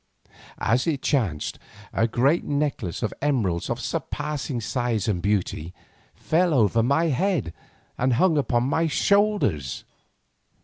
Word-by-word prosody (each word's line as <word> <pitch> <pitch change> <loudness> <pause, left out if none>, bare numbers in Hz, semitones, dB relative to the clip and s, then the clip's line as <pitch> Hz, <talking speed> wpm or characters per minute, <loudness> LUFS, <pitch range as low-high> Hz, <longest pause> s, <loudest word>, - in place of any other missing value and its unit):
As 125 +8 +1
it 145 -5 -1
chanced, 100 - -1 0.3
a 115 - +2
great 135 +8 +2
necklace 140 - -2
of 110 - -1
emeralds 110 -13 0
of - - -2
surpassing 145 -4 -3
size 115 -2 -1
and 95 -5 0
beauty 90 -4 -1 0.4
fell 170 0 +1
over 115 -1 +3
my 140 +8 +2
head 145 - 0 0.5
and 125 +1 +2
hung 165 +7 +3
upon 125 -5 +1
my 160 +5 +1
shoulders. 200 - +1
125 Hz, 125 wpm, -24 LUFS, 105-150 Hz, 0.5 s, over